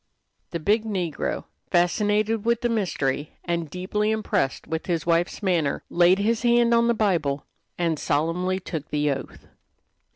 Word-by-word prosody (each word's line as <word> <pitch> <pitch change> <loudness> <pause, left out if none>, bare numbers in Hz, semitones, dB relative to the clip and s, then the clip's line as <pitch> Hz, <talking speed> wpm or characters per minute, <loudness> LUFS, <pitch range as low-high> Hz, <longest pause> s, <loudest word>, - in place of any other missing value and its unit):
The 170 - -3
big 210 +7 +2
negro, 185 -8 -2 0.3
fascinated 210 +4 +2
with 235 +1 +1
the 240 - +1
mystery, 150 - -1
and 170 -2 -2
deeply 195 +5 -1
impressed 215 -11 0
with 160 0 -4
his 170 -3 -1
wife's 170 +4 +1
manner, 170 -7 +1
laid 175 +2 +5
his 220 +3 +1
hand 240 -1 +4
on 235 0 +4
the 235 - +2
Bible 170 -10 0 0.3
and 165 -3 0
solemnly 175 +5 0
took 160 -5 -6
the 150 -1 +1
oath. 135 - -6
180 Hz, 150 wpm, -25 LUFS, 160-215 Hz, 0.3 s, laid